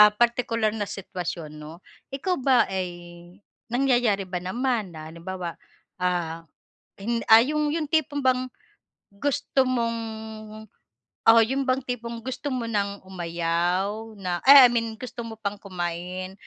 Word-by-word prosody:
partikular 230 -2 +1
na 205 -2 -3
sitwasyon 175 -4 -5
'no, 155 +3 -10 0.3
ikaw 320 +7 -1
ba 260 -1 +4
ay 185 -1 -1 0.8
nangyayari 245 -5 +2
ba 180 -1 -4
naman 230 +2 -1
na 155 0 -8
halimbawa, 175 +1 -6 0.5
ah, 170 -2 -1 0.9
ah, 225 +1 +9
yung 300 +1 0
yung 325 -2 -1
tipong 295 -3 +1
bang 255 0 +2 0.7
gusto 265 +4 +1
mong 230 -2 0 1.3
oo 230 0 +8
yun 265 +4 -1
bang 255 +1 +2
tipong 235 -2 -4
gusto 260 +3 -4
mo 245 -2 -2
nang 200 -2 -1
umayaw 180 +4 -1
na, 180 -2 -2
eh, 275 -2 +11
I - - -3
mean 230 -2 -1
gusto 245 -1 -6
mo 225 - -7
pang 205 -1 -3
kumain, 180 0 -4
220 Hz, 130 wpm, -25 LUFS, 180-250 Hz, 1.3 s, eh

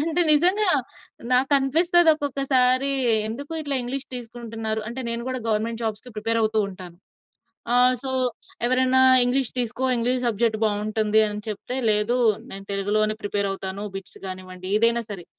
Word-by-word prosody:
అంటే 325 +3 0
నిజంగా 365 +7 +3 0.6
నాకనిపిస్తది 285 +7 +3
ఒక్కొక్కసారి 275 -2 +1 0.4
ఎందుకు 280 +8 -7
ఇట్లా 285 -2 -3
ఇంగ్లీష్ 270 +3 -5
తీసుకుంటున్నారు? 225 -2 -5
అంటే 240 +3 -5
నేను 235 0 -2
గూడా 255 -1 -3
గవర్నమెంట్ 225 +1 -1
జాబ్స్‌కి 220 +2 -4
ప్రిపేర్ 225 +2 -1
అవుతూ 220 0 0
ఉంటాను. 180 -2 -11 0.8
ఆహ్, 250 +1 +5
సో 265 - -1 0.6
ఎవరైనా 255 +1 +3 0.2
ఇంగ్లీష్ 250 0 0
తీసుకో 245 +1 -1
ఇంగ్లీష్ 245 +2 0
సబ్జెక్ట్ 225 0 0
బావుంటుంది 215 +1 +1
అని 210 0 -5
చెప్తే 215 +4 -5
లేదు 210 +3 +2 0.3
నేను 195 0 -6
తెలుగులోనే 210 +2 0
ప్రిపేర్ 205 -1 -1
అవుతాను. 195 +1 -4
బిట్స్ 195 -1 -8
గానివ్వండి 185 0 -7
ఏదైనా 230 +2 +4
సరే 190 -4 -6
235 Hz, 135 wpm, -23 LUFS, 210-260 Hz, 0.8 s, ఆహ్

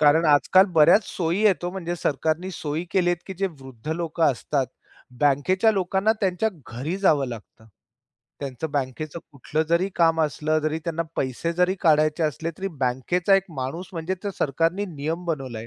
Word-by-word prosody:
कारण 155 +2 +5
आजकाल 170 +6 +5
बऱ्याच 170 +7 +6
सोयी 175 +4 -1
येतो, 185 -4 +2
म्हणजे 175 -2 -4
सरकारने 160 +4 -1
सोयी 155 0 -3
केलीत, 175 -2 +2
की 190 - -6
जे 195 - +1
वृद्ध 130 0 -11
लोकं 165 -1 -1
असतात. 135 +1 -1 0.5
बँकेच्या 165 +10 +3
लोकांना 190 +2 +1
त्यांच्या 195 +2 +1 0.2
घरी 135 +10 -4
जावं 150 -8 +3
लागतं. 110 -1 -10 0.7
त्यांचं 140 +2 -4
बँकेचं 145 +3 -3
कुठलं 145 +3 -2
जरी 170 +3 +2
काम 165 -1 +3
असलं. 155 +1 0
जरी 155 +1 -1
त्यांना 165 -1 -1
पैसे 130 +6 -1
जरी 180 +2 +2
काढायचे 155 0 +3
असले, 160 +2 -1
तरी 195 +1 -2
बँकेचा 130 +10 +2
एक 195 -1 +3
माणूस 150 +8 -4
म्हणजे 165 +2 -2 0.2
सरकारने 165 +7 +1
नियम 160 +5 -3
बनवलाय. 130 -8 -4
160 Hz, 155 wpm, -24 LUFS, 145-180 Hz, 0.7 s, बऱ्याच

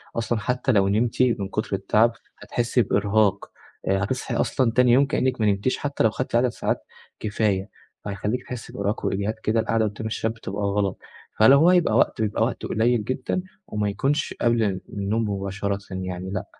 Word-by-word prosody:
أصلًا 115 0 -1
حتّى 125 +5 0
لو 100 -4 +3
نمتِ 115 +5 +1
من 115 -6 +1
كتر 105 -1 -2
التعب، 110 +4 +3 0.3
هتحسّي 120 +1 +1
بإرهاق، 105 -1 +1 0.4
آآ، 95 0 +2
هتصحي 130 +6 -2
أصلًا 130 -4 +1
تاني 125 +1 +4
يوم 135 +4 +5
كإنِّك 130 -3 0
ما 105 - +3
نمتِيش 100 +5 +1
حتّى 145 -1 -1
لو 110 - +5
خدتِ 130 0 -3
عدد 120 +2 +4
ساعات - - -2 0.4
كفاية 105 -3 -1 0.4
فهيخلّيكِ 105 +5 -2
تحسّي 125 -3 -7
بإرهاق 100 +2 -2
وإجهاد 100 +2 0
كده 110 +1 +1
القعدة 110 0 +1
قدام 105 +1 -4
الشاشة 110 0 -2
بتبقى 105 -2 -5
غلط. 100 -1 0 0.4
فلو 110 +6 +8
هو 170 +4 +6
يبقى 175 -12 +3
وقت، 115 - +2
بيبقى 105 -2 +1
وقت - - -2
قليل 115 0 +1
جدًا، 130 - -2 0.3
وما 105 -1 -1
يكونش 135 +9 -1
قبل 120 -1 +3
ال 95 -3 -1
النوم 105 +2 -1
مباشرة 100 0 -2
يعني 95 0 -4
لأ، 95 - -3
110 Hz, 175 wpm, -24 LUFS, 100-120 Hz, 0.4 s, فلو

